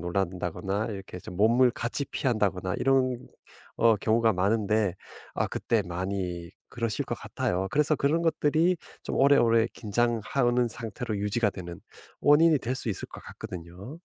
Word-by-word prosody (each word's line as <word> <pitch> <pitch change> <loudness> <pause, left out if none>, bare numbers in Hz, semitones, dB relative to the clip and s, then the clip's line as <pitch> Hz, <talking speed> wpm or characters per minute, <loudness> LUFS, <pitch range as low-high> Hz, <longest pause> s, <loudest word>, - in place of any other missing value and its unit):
놀란다거나 95 +3 -2
이렇게 95 -2 -7
좀 90 0 -9
몸을 120 +5 +4
같이 120 +5 -3
피한다거나 100 -9 -1
이런 130 -2 +2 0.6
어 115 -2 +4
경우가 110 +2 +2
많은데 105 0 +1 0.4
아 - - 0
그때 115 -3 0
많이 90 -1 -4 0.2
그러실 115 -3 -2
것 - - -4
같아요. 90 +2 -2
그래서 150 +2 +2
그런 155 +4 +1
것들이 165 +2 +2 0.3
좀 - - -4
오래오래 115 -5 +5
긴장하는 120 +2 +1
상태로 115 -1 -4
유지가 105 +2 +1
되는 85 -2 -8 0.4
원인이 155 +1 +5
될 125 +2 -3
수 120 - -2
있을 100 - -3
것 - - -10
같거든요. 90 - -9
110 Hz, 325 characters per minute, -27 LUFS, 95-125 Hz, 0.6 s, 오래오래